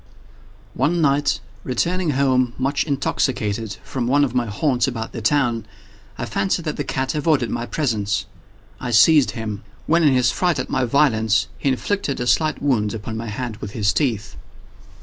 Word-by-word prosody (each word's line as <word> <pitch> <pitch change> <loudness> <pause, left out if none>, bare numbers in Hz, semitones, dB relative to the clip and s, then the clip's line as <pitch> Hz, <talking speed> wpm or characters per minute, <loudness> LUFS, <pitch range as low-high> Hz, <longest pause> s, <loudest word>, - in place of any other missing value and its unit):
One 175 +3 +1
night, 145 -2 +2 0.2
returning 175 +7 0
home, 130 -3 +2
much 135 +2 0
intoxicated, 115 -7 -1
from 125 -3 -3
one 145 +3 +4
of 130 -4 0
my 125 -2 0
haunts 125 +4 +1
about 115 -3 -4
town, 120 -2 +2 0.5
I - - -3
fancied 190 -3 -1
that 150 - -2
the 145 - -1
cat 130 0 -2
avoided 150 -5 +1
my 120 0 -3
presence. 105 -8 -1 0.5
I 125 - -4
seized 135 +5 +6
him; 105 -2 -4 0.2
when, 165 +2 +3
in 150 -4 +5
his 125 -1 +3
fright 175 -2 +1
at - - -4
my 130 -1 +1
violence, 115 -5 +2
he 140 - +1
inflicted 140 +3 -1
a 125 - -1
slight 155 +4 +1
wound 115 -7 +1
upon 110 +1 -6
my 115 +1 -4
hand 110 +1 -4
with 105 -1 -7
his 105 -3 +1
teeth. 115 -9 -1
130 Hz, 170 wpm, -21 LUFS, 115-145 Hz, 0.5 s, seized